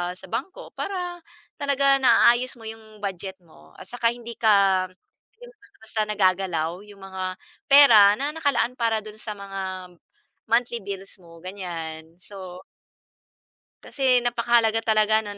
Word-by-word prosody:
sa - - -13
bangko, 370 - -5
para 360 -3 -4 0.4
talaga 275 -1 +3
naaayos 255 0 +4
mo - - -13
yung 220 -1 -11
budget 190 -1 -5
mo, 80 - -20
at - - -9
saka 235 -1 0
hindi 235 -1 -9
ka, 195 -4 +3 0.5
hindi - - -17 0.2
basta-basta 220 - -6
nagagalaw 185 -4 0
yung 200 -1 -15
mga 190 -1 -6 0.5
pera 220 -8 +8
na 285 +2 -1
nakalaan 285 -5 0
para 225 -2 +1
do'n 215 0 -11
sa 215 -1 -6
mga 190 -2 -6 0.6
monthly 235 0 +1
bills 195 -1 -7
mo, 170 -2 -16
ganyan. 165 -4 -7
So 185 -2 -10 1.2
Kasi 255 -3 +1
napakahalaga 230 -2 +2
talaga 220 -1 +2
‘no 205 -1 -8
215 Hz, 135 wpm, -24 LUFS, 190-240 Hz, 1.2 s, pera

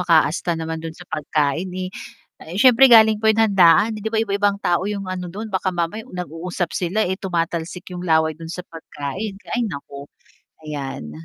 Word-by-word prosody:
makaasta 170 0 +2
naman 160 0 -4
dun 165 0 -7
sa 175 - -12
pagkain, 150 +2 -1
eh, 185 0 -4 0.7
syempre 255 +4 +7
galing 220 -3 +7
pa 220 - +2
yung 220 +1 +4
handaan 190 +4 +5
'di 220 - -2
ba 225 - -3
iba-ibang 205 -1 +1
tao 175 +3 +1
yung 200 -1 -3
ano 180 -1 -4
dun. 210 +4 -7
Baka 190 0 0
mamaya 175 +6 -2
nag-uusap 175 0 -4
sila, 190 +5 0
eh, 190 +2 -3
tumatalsik 170 -1 -3
yung 180 - -5
laway 160 -2 +3
dun 160 +1 -10
sa 180 0 -6
pagkain, 165 +5 -6 0.2
ay 245 - 0
naku, 140 -3 -8 0.5
ayan. 135 - -6
180 Hz, 170 wpm, -21 LUFS, 160-205 Hz, 0.7 s, syempre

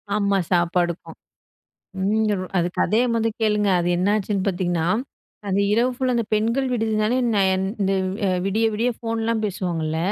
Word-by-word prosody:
ஆமா, 200 -1 +1
சாப்பாடுக்கும். 175 0 0 0.9
ம் 205 -1 +1
அது 175 0 +1
கதைய 220 +3 +2
மொத 225 -1 +1
கேளுங்க. 210 -2 +2
அது 175 - -1
என்னாச்சுன்னு 200 +1 0
பார்த்தீங்கன்னா? 175 -3 -1 0.6
அது 195 +1 +1
இரவு 235 +4 +3
ஃபுல்லா 255 -1 0
அந்த 235 - 0
பெண்கள் 230 +5 +1
விடுதினாலே 220 0 0 0.2
நான் 195 -2 +3 0.3
இந்த 195 0 +1 0.3
அ - - +2 0.2
விடிய 220 +3 +1
விடிய 235 +4 +1
ஃபோன்லாம் 225 -1 -1
பேசுவாங்கல்ல, 170 -5 -2
210 Hz, 135 wpm, -22 LUFS, 185-225 Hz, 0.9 s, இரவு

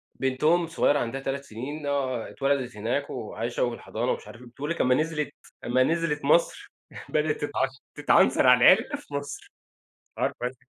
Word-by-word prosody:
بنتهم 150 +6 +2
الصغيرة 160 -3 +1
عندها 130 +2 -3
3 135 +1 -3
سنين 140 +5 -7
آه 130 -4 -1
اتولدت 135 -4 -1
هناك 120 +7 -2
وعايشة 115 0 -3
وفي 120 -1 -1
الحضانة 120 +3 -3
ومش - - -5
عارف 115 - -12
إيه. 125 - -12
بتقول 135 +5 -6
لِك 170 - -1
لما 125 0 +4
نزلت 155 0 -1 0.3
لما 125 +2 +2
نزلت 160 -1 -1
مصر 170 +4 +2 0.4
بدأت 155 0 +1
تتعش 140 -2 0 0.3
تتعنصر - - +4
على - - +6
العرق - - -2
في - - -12
مصر، 145 0 -6 0.7
عارفة 120 - -1
أنتِ 125 +1 -5
135 Hz, 170 wpm, -26 LUFS, 125-150 Hz, 0.7 s, على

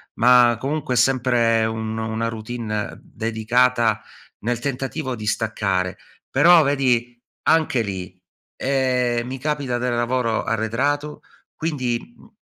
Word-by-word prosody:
ma 120 -1 +5
comunque 140 0 -2
è - - 0
sempre 120 -2 +3
un 110 0 -3
una 110 0 -2
routine 110 -1 -4
dedicata 115 0 +1 0.4
nel 120 +2 -2
tentativo 135 +1 -3
di 110 -2 -7
staccare. 100 -4 -1 0.3
Però 175 -1 +6
vedi 125 -4 +1 0.2
anche 155 -6 +3
lì, 95 -2 -6 0.4
ehm, 125 -3 0
mi 130 +1 -5
capita 140 -3 -1
del 125 0 -1
lavoro 120 -1 0
arretrato, 140 +7 -1 0.3
quindi, 130 -7 -1 0.2
mhmm, - - -18
120 Hz, 115 wpm, -22 LUFS, 110-130 Hz, 0.4 s, Però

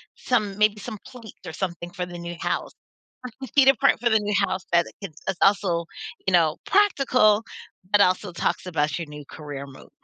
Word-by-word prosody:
some 210 -5 -1
maybe 210 0 +3
some 215 +1 -7
plates, 235 -4 -11
or - - -7
something 175 -1 -4
for 180 -1 -4
the 175 0 -9
new 170 0 -6
house, - - -2
or - - -62 0.5
with 265 - -8
cheetah 270 -1 +7
print - - +4
for 240 +1 +1
the 220 -1 +4
new 210 0 -2
house 185 0 -4
that 170 0 +4
it - - -13
can 195 -4 -6 0.2
is 190 - 0
also, 195 -4 +3 0.4
you - - +3
know, 165 -3 +4
practical, 255 - +4 0.5
but 205 - +5
also 185 +1 +2
talks 175 - -2
about 150 -4 0
your 170 - -5
new 150 0 -9
career 145 -3 -7
move. 135 -1 -14
190 Hz, 205 wpm, -24 LUFS, 170-215 Hz, 0.5 s, cheetah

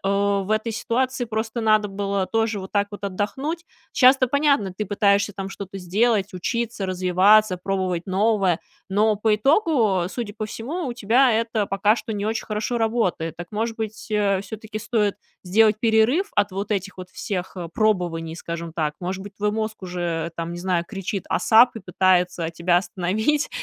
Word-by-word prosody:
в 200 0 +1
этой 215 +1 0
ситуации 255 +3 -1
просто 220 +1 -3
надо 215 -1 +3
было 195 -1 -2
тоже 225 -2 0
вот 190 - -8
так 205 0 +1
вот 205 - -8
отдохнуть? 265 - -3 0.3
Щас 260 +1 +6
то 255 -1 +1
понятно, 280 -8 +2
ты 210 - -2
пытаешься 200 0 +2
там 195 -1 -5
что-то 195 0 -8
сделать, 200 +2 +1
учиться, 225 +2 -2
развиваться, 185 +2 +4
пробовать 185 -2 -2
новое. 195 -2 +2 0.3
Но 210 +2 +2
по 210 +1 +2
итогу, 225 - +2
судя 220 -1 -5
по 215 - -4
всему, 285 +10 -5
у 245 - -3
тебя 240 +2 +3
это 225 -2 0
пока 200 +3 +2
что 220 - -5
не 205 0 -3
очень 220 +1 -2
хорошо 215 +3 -2
работает. 220 -8 0
Так, 175 +1 -8
может 225 +2 -2
быть, 220 0 -6
э, 200 -2 +2
все-таки 215 +1 -7
стоит 215 -2 0 0.3
сделать 215 +3 +3
перерыв 235 - +3
от 205 -1 +2
вот 195 +2 -4
этих 200 -2 -3
вот 180 0 -8
всех, 185 0 -5
э, 175 -2 -5
пробований, 175 -6 0
скажем 170 -1 -6
так? 155 -2 -1
Может 190 +1 -4
быть, 200 0 -10
твой 210 0 0
мозг 215 0 -3
уже, 170 -2 -3
там, 170 0 -4
не 175 - -6
знаю, 175 -1 0
кричит: 195 -1 -4
"Асап!" 230 +6 +5
И - - -6
пытается 180 -2 +1
тебя 170 +1 +1
остановить? 205 +10 0
205 Hz, 175 wpm, -23 LUFS, 185-225 Hz, 0.3 s, Щас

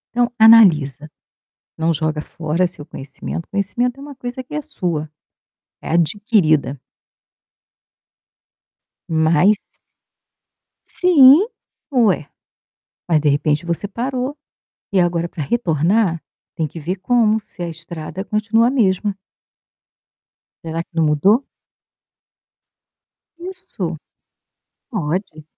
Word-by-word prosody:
Então, 245 0 +2
analisa, 160 - +5 0.7
não 165 +1 +1
joga 155 0 -2
fora 165 +3 -2
seu 175 -4 -9
conhecimento, 145 +3 -8
conhecimento 240 +6 -2
é - - -11
uma 285 -1 -10
coisa 250 0 -6
que 285 +4 -8
é - - -1
sua, 165 - -4 0.7
é - - -8
adquirida. 160 - +1 2.3
Mas 165 +5 +3 1.3
Sim, 320 0 +6 0.5
ué. 210 - +2 0.8
Mas, 160 -3 +3
de 150 -1 +1
repente, 150 +3 0
você 170 +4 -3
parou, 255 +6 -3 0.6
e 190 - +3
agora 175 -1 0
para 160 - -6
retornar, 170 - 0 0.3
tem 160 - -1
que 165 - -10
ver 175 +5 -3
como, 220 +2 +2
se 180 - -8
a 170 - -4
estrada 165 +2 -7
continua 220 +3 +1
a - - +1
mesma. 205 -5 +1 1.5
Será 165 0 -3
que 170 - -15
não 165 - +2
mudou? 190 - +3 1.9
Isso. 355 - -6 0.9
Pode. 175 -4 -4
180 Hz, 105 wpm, -19 LUFS, 160-230 Hz, 2.3 s, Sim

